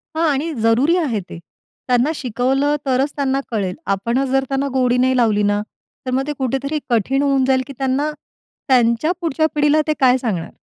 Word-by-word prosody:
हां. 325 +1 +1
आणि 315 +4 -2
जरुरी 250 +9 +3
आहे 260 - 0
ते. - - -8 0.5
त्यांना 250 +4 +2
शिकवलं, 265 +3 0
तरच 265 +2 +1
त्यांना 275 -1 0
कळेल. 195 -5 -2 0.2
आपण 235 +7 -1
जर 270 0 +2
त्यांना 275 +1 -1
गोडी 250 -1 +2
नाही 260 +1 +2
लावली 215 -3 +2
ना, 205 0 +1 0.4
तर 255 - -3
मग 270 +2 -1
ते 295 - -2
कुठेतरी 270 +4 -1
कठीण 245 +4 +1
होऊन 275 -2 +2
जाईल 260 -1 +2
की 275 - -8
त्यांना 270 +3 0 0.6
त्यांच्या 245 +4 +3
पुढच्या 315 -1 0
पिढीला 295 +1 +3
ते 310 - +2
काय 260 -1 +4
सांगणार? 210 -10 -3
265 Hz, 180 wpm, -19 LUFS, 240-285 Hz, 0.6 s, काय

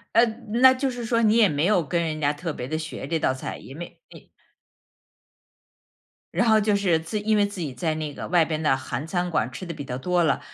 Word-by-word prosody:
呃 230 +1 +7 0.4
那 260 0 +9
就 265 +1 -1
是 245 -2 -5
说 230 0 +1
你 220 0 +4
也 220 - +6
没 150 -2 0
有 185 -3 +3
跟 170 +4 -1
人 155 -2 -3
家 145 -1 +1
特 165 +3 -4
别 125 -4 -6
地 155 +3 -2
学 155 -3 -6
这 165 - 0
道 130 - +1
菜， 130 - -6
也 135 - -12
没 170 +4 -9
没 - - -15 2.0
然 240 - +2
后 220 0 +6
就 210 0 +2
是 190 -5 +2
自 165 +7 -4
因 215 +1 +1
为 205 -1 +4
自 205 -2 -7
己 150 -6 -4
在 155 +6 -1
那 155 -2 -4
个 - - -7
外 175 -2 +4
边 155 -1 -3
的 150 -4 +3
韩 130 +1 -5
餐 175 +1 -2
馆 125 -7 0
吃 185 - -7
得 170 - -5
比 150 -2 -7
较 125 -2 -5
多 180 +5 +1
了， 155 - +2
165 Hz, 260 characters per minute, -24 LUFS, 150-205 Hz, 2.0 s, 那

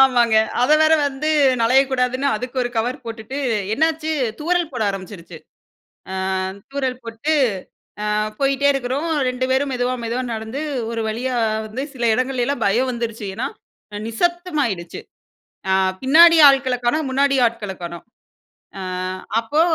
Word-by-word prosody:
ஆமாங்க. 240 -4 +4 0.3
அதை 295 +5 +5
வேற 315 0 +4
வந்து 285 +3 -2 0.3
நழையக்கூடாதுன்னு, 255 +1 +2
அதுக்கு 250 +4 -7
1 245 - -3
கவர் 250 +4 -2
போட்டுட்டு 230 +3 -6 0.4
என்னாச்சு 315 +2 0 0.3
தூறல் 345 +1 0
போட 245 -3 -2
ஆரம்பிச்சுருச்சு. 185 -3 -8 0.7
அ - - -4 0.6
தூறல் 265 -2 -2
போட்டு, 230 +7 -2 0.8
அ - - +1 0.3
போயிட்டே 275 0 +2
இருக்கிறோம். 275 +4 -2 0.2
2 255 0 -2
பேரும் 270 +2 +1
மெதுவா 250 0 0
மெதுவா 235 +3 -2
நடந்து 220 +5 -5 0.3
ஒரு 230 -1 -3
வழியா 245 +4 -2 0.3
வந்து 225 +5 -5
சில 240 -2 -3
இடங்கள்லலாம் 255 0 -1
பயம் 245 +6 +2
வந்துருச்சு. 230 -3 -4
ஏன்னா, - - -2 0.5
அ - - -4
நிசப்தமாயிடுச்சு. 290 - -2 0.7
அ - - +4 0.3
பின்னாடி 330 +5 +7
ஆள்களை 270 -2 +2
காணோம், 295 +4 +1
முன்னாடி 275 +1 +2
ஆட்களை 210 -4 -4
காணோம். 170 0 -7 0.8
அ - - -5 0.6
அப்போ 290 +8 +1
255 Hz, 130 wpm, -20 LUFS, 230-280 Hz, 0.8 s, பின்னாடி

